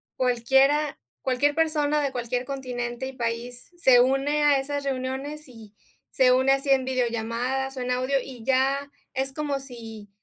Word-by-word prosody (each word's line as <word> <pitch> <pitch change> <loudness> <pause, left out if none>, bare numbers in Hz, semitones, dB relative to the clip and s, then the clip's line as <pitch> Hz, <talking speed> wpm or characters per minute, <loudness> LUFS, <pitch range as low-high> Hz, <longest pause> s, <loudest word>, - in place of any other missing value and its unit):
cualquiera 270 +4 +2 0.2
cualquier 265 +3 +1
persona, 300 -2 +1
de 280 -2 -1
cualquier 245 0 -3
continente 250 -2 -4
y 265 - -7
país, 245 +3 -4
se 260 -7 +6
une 275 +4 +2
a 285 -2 +5
esas 285 +1 -3
reuniones 270 +3 -4
y 220 -4 -14 0.4
se 255 -1 +4
une 260 +1 +4
así 275 +1 -1
en 265 -1 +4
videollamadas 250 +2 -1
o - - -3
en 250 - -3
audio. 255 +2 +1
Y 250 -4 -10
ya 270 +2 +1 0.2
es 265 +1 -2
como 290 -2 -2
si 225 -5 -10
265 Hz, 160 wpm, -25 LUFS, 245-275 Hz, 0.4 s, se